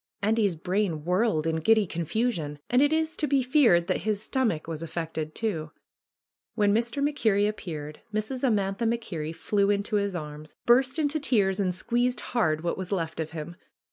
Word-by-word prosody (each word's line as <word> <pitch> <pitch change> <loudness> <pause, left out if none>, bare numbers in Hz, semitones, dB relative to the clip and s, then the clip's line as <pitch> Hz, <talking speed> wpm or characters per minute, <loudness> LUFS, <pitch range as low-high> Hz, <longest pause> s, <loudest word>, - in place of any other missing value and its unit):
Andy's 210 -3 +2
brain, 180 -2 -1
whirled 180 -3 +1
in 160 0 0
giddy 220 +6 +4
confusion, 170 -2 -2
and 250 +2 +5
it 290 +1 +4
is 320 0 0
to 300 - 0
be 275 -1 +2
feared 250 - +4
that 185 - 0
his 210 +1 -1
stomach 220 - -1
was 160 -1 -4
affected 160 -2 -4
too. 170 -9 -2 0.9
When 205 -1 +3
Mr. 235 +5 0
MacKerrie 220 -9 +2
appeared 155 -8 -6
Mrs. 215 +5 -3
Amantha 210 -2 +1
Mac 235 +1 0
Kerrie 160 -8 -5
flew 200 +5 0
into 205 +1 +1
his 200 -2 -1
arms, 150 -1 -7
burst 260 +4 +4
into 305 0 +1
tears 205 -8 +2
and 190 -2 +1
squeezed 240 +7 0
hard 155 -11 +2
what 175 +2 -2
was 185 0 -5
left 165 -5 -2
of 160 -1 -2
him. 160 +1 -7
200 Hz, 175 wpm, -27 LUFS, 165-235 Hz, 0.9 s, and